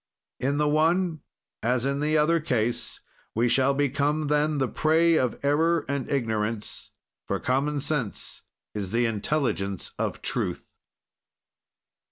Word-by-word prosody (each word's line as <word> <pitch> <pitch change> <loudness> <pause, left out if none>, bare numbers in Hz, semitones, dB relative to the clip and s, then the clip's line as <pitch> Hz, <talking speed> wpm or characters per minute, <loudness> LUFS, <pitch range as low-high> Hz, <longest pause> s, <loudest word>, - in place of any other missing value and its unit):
"In 140 +3 0
the 150 0 +2
one 160 +2 +2 0.4
as 125 +1 +1
in 140 +1 0
the 155 +1 +2
other 165 +3 +3
case, 120 -6 -1 0.3
we 115 +2 +3
shall 135 +3 +3
become, 145 +2 +1
then, 150 0 +2
the 135 -2 +1
prey 165 +5 +3
of 125 -6 +1
error 160 +3 +2
and 140 -2 -2
ignorance, 110 -4 -2 0.4
for - - -1
common 140 +3 0
sense 135 -9 -2 0.3
is 100 -3 -3
the 120 +4 +1
intelligence 105 - -1
of - - -2
truth." - - -2
140 Hz, 130 wpm, -26 LUFS, 120-155 Hz, 0.4 s, other